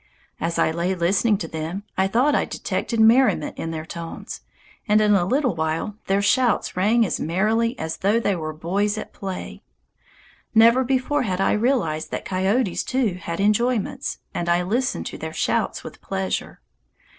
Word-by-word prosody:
As 165 +1 -2
I - - +2
lay 170 +3 -1
listening 195 +5 +2
to 165 - -5
them, 160 +5 -5
I 190 0 +2
thought 250 +9 +2
I - - +2
detected 230 - -3
merriment 225 - +4
in 165 - -3
their 160 -1 -5
tones, 165 0 -7 0.5
and 210 0 +4
in 210 -1 +4
a 185 -3 +3
little 255 +3 +1
while 160 +5 -2
their 195 +1 +2
shouts 245 +2 +2
rang 220 +5 +3
as - - -2
merrily 220 +8 +1
as 160 0 -4
though 205 +4 +2
they 200 -4 0
were 155 -2 -4
boys 195 +7 -1
at - - -7
play. 190 -2 -6 0.9
Never 230 +3 +6
before 265 +3 0
had 190 -6 -2
I 195 - +2
realized 210 - 0
that - - -5
coyotes 190 +2 0
too 235 -9 -1
had 170 +2 -4
enjoyments, 215 +2 0 0.2
and 175 0 -2
I 175 +1 +3
listened 240 +8 -1
to - - -6
their - - -5
shouts - - -1
with - - -10
pleasure. 190 -1 -3
200 Hz, 170 wpm, -23 LUFS, 170-230 Hz, 0.9 s, Never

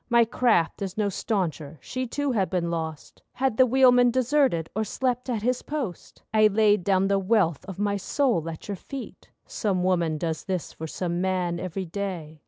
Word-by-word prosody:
My 235 -1 +5
craft 225 -8 +1
is 195 -1 -4
no 210 -2 +1
stauncher, 165 -7 -2
she 255 - -4
too 285 +3 -1
had 200 -6 0
been 175 -3 -1
lost 160 -2 -5
Had 260 -4 0
the 260 - +6
wheelman 250 -1 +5
deserted, 255 - +2
or 220 - +1
slept 250 +3 -2
at 225 -4 -2
his 250 +1 +1
post. 270 - -6
I 215 -1 +6
laid 210 -2 +3
down 195 +1 +2
the 200 0 +2
wealth 190 - +1
of 190 -3 -8
my 205 0 0
soul 200 - 0
at 160 - -8
your 200 -2 -4
feet 275 +7 -9 0.2
(Some 190 -5 -1
woman 170 -4 +1
does 160 0 -3
this 185 -4 -3
for 160 - -6
some 175 +2 -3
man 180 -2 0
every 185 +1 -4
day). 170 -4 -5
200 Hz, 190 wpm, -26 LUFS, 170-240 Hz, 0.2 s, the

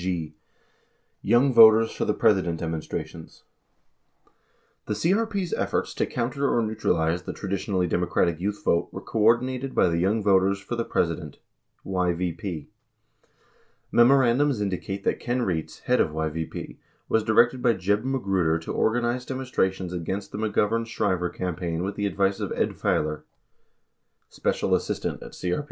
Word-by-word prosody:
43 90 -3 -2 1.0
g. - - -3
Yowng 130 +3 +4
Voters 110 0 +7
for - - -3
the - - +1
President 90 -5 +2
Demonstrations 80 0 -6 1.4
The 105 - -1
CRP's 195 - 0
efforts - - -1
to - - -1
counter 130 +4 -1
or 115 - +2
neutralize 90 -6 0
the - - -6
traditionally 95 -1 -2
Demo 90 +1 0
cratic 85 -2 +1
youth 100 +3 -3
vote 85 - +2
were - - -6
coordinated 125 +4 +1
by - - +4
the 85 0 0
Young 100 +5 +1
Voters 100 0 +3
for 100 +5 -5
the 115 - -1
Presi 85 -2 0
dent 75 -5 -10 0.5
(YVP). 90 -3 -2 1.3
Memorandums 130 +1 +4
indicate 100 0 -3
that - - 0
Ken 125 +1 -1
Rietz, 85 -7 -3
head - - +2
of - - +1
YVP, 80 +1 -4 0.3
was 110 - +1
directed 120 +4 +3
by 120 - +4
J 95 0 0
eb 105 +2 -1
Magruder 95 -11 0
to 80 - -6
organize 120 +2 0
demonstrations 95 -9 -2
against 95 +4 -4
the 105 - -5
McGovern 110 +1 0
Shriver 95 -5 -1
campaign 90 -2 -3
with 100 +2 -2
the 105 -1 -1
advice 100 0 0
of - - -3
Ed - - 0
Failor, 75 0 -1 1.1
special - - -1
assistant - - -1
at - - -10
CRP. 90 -1 -2
100 Hz, 150 wpm, -25 LUFS, 90-120 Hz, 1.4 s, Voters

